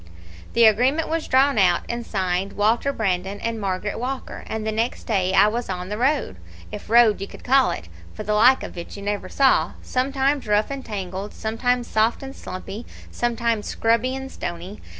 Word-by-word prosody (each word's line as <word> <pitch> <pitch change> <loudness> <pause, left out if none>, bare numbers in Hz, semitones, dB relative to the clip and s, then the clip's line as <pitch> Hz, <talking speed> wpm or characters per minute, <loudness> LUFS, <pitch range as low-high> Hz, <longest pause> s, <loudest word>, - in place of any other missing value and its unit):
"The 235 0 +6
agreement 250 +9 +3
was 325 0 -2
drawn 265 -2 +4
out 180 -3 +4
and 235 0 -3
signed 190 -2 -2
Walter 225 +6 +2
Brandon 195 -4 -2
and 230 -1 -3
Margaret 195 +1 -2
Walker, 260 +2 -5
and 220 -1 -4
the 220 - 0
next 225 +3 -2
day 190 -4 0
I - - +7
was 235 +2 -2
on 180 0 -4
the 210 - -3
road, 265 - +1 0.3
if - - -8
road 230 -3 +5
you 195 - -4
could - - -13
call 265 +1 +4
it, - - -5 0.3
for 215 - -6
the 210 - -1
like 245 +5 +5
of - - -7
it 170 - -8
you 200 - -8
never 205 0 -3
saw 270 -1 +3
sometimes 270 +1 0
rough 210 +4 +2
and 275 -1 -5
tangled, 195 -1 -5
sometimes 240 +3 -1
soft 220 +4 +1
and 270 0 -8
slumpy, 195 +5 -7 0.2
sometimes 235 -2 -1
scrubby 230 +3 +1
and 265 0 -6
stony. 175 +4 -6
225 Hz, 190 wpm, -23 LUFS, 200-255 Hz, 0.3 s, I